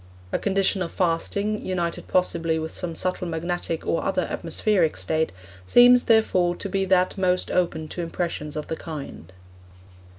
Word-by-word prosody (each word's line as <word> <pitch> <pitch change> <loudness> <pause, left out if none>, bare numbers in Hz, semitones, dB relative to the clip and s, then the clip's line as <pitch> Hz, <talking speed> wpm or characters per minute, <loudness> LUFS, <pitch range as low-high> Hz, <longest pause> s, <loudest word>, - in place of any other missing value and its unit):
A - - 0
condition 195 -1 +1
of 170 - -2
fasting, 200 +4 -1
united 175 -2 -2
possibly 165 -3 +1
with 160 0 -4
some 170 -3 -4
subtle 185 +1 -1
magnetic 170 0 -3
or 165 - 0
other 190 -2 0
atmospheric 170 0 0
state, 160 0 0 0.4
seems, 245 - +7
therefore, 185 -6 +3
to 200 - -5
be 195 0 0
that 185 +1 +2
most 185 -1 +1
open 165 -3 0
to 175 - -5
impressions 165 -3 -3
of 150 - -3
the 160 - -4
kind. 150 - -8
175 Hz, 155 wpm, -24 LUFS, 165-190 Hz, 0.4 s, seems